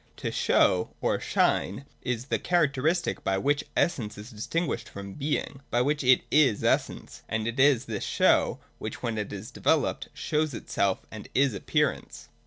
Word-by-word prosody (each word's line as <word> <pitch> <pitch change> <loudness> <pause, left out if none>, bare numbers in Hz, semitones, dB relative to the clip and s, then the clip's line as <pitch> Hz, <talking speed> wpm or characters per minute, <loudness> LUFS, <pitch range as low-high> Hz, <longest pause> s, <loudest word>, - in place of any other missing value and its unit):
To - - -3
show 90 -1 +3
or - - 0
shine 105 +9 0 0.2
is 125 -1 -2
the - - -1
characteristic 160 0 +1
by 95 0 +1
which 145 +7 +1
essence 115 -12 0
is 105 +4 -9
distinguished 160 +10 -2
from 100 0 -8
being, 145 -1 -3
— - - -38
by 120 +1 +2
which 145 +1 0
it 130 0 +5
is 140 -8 +4
essence; - - -1
and 110 0 -1
it 115 +3 -3
is 135 -2 +5
this 105 -3 -4
show - - +3 0.2
which, - - -6
when 115 -3 -1
it 105 - -4
is 100 +1 -7
developed, - - 0
shows 150 -3 -1
itself, 100 -3 -1
and 110 -1 -9
is 135 -2 +3
Appearance. 100 - -1
125 Hz, 170 wpm, -27 LUFS, 105-145 Hz, 0.2 s, it